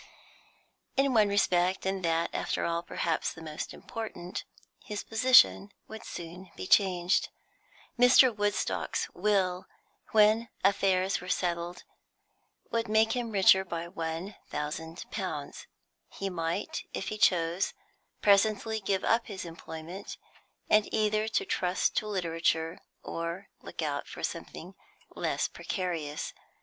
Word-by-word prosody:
In 270 -1 +3
one 215 -3 +5
respect, 185 -2 +2
and 190 -1 -1
that, 165 0 +1
after - - -1
all, 170 0 0
perhaps 165 -1 -1
the 160 - -11
most 155 -1 -5
important, 220 -6 -6 0.4
his 210 -4 -5
position 225 -3 +5 0.2
would 220 0 -9
soon 175 +2 -8
be - - -6
changed. 185 -2 +3 0.7
Mr. 250 -1 +7
Woodstock's 205 0 -1
will, 185 -2 +1 0.4
when 220 +2 +4
affairs 195 -1 +2
were 180 - -8
settled, 175 -1 -1 0.9
would 230 0 0
make 220 +1 +3
him 240 -1 -1
richer 190 -2 +6
by 170 -2 -4
one 165 +4 -4
thousand 160 +3 -4
pounds; 180 -9 -5 0.4
he 195 -1 -4
might, 165 -1 -2
if 195 - -3
he 215 - -4
chose, 175 -2 +2 0.5
presently 215 +2 +3
give 195 -2 -1
up 230 +2 +2
his 195 -4 -6
employment, 165 +2 -8 0.5
and 215 -1 +3
either 215 0 +1
trust 185 -4 0
to 215 - 0
literature, 165 -3 0 0.2
or 170 +4 -5
look - - -6
out - - -2
for - - -9
something - - -5 0.4
less - - -1
precarious. 170 -6 -4
190 Hz, 120 wpm, -30 LUFS, 170-215 Hz, 0.9 s, Mr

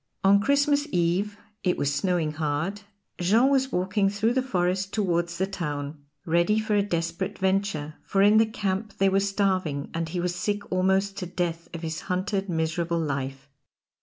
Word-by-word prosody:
On 200 +1 +6
Christmas 285 +3 +2
Eve 180 +4 0 0.3
it 180 - +1
was 145 0 0
snowing 165 0 0
hard 155 +6 -2 0.4
Jean 220 +9 +4
was 265 -1 +2
walking 195 +2 +1
through 210 +4 +1
the 260 - +2
forest 190 -5 0
towards 175 -4 0
the 190 - +1
town, 145 -6 -5 0.2
ready 170 +5 +2
for 215 -1 -1
a 205 - +4
desperate 170 -1 -2
venture, 190 -6 0
for 195 -1 +2
in 210 +2 +6
the 225 - +4
camp 210 0 -3
they 195 0 +4
were 195 +1 +3
starving, 190 -7 0
and 165 -1 -2
he 175 +2 -3
was 175 0 -1
sick 205 +3 -3
almost 190 +2 +1
to 180 - -4
death 170 -1 -3
of 170 0 -7
his 160 -1 -3
hunted, 195 +2 -1
miserable 165 +1 0
life. 135 -3 -3
185 Hz, 170 wpm, -26 LUFS, 165-200 Hz, 0.4 s, On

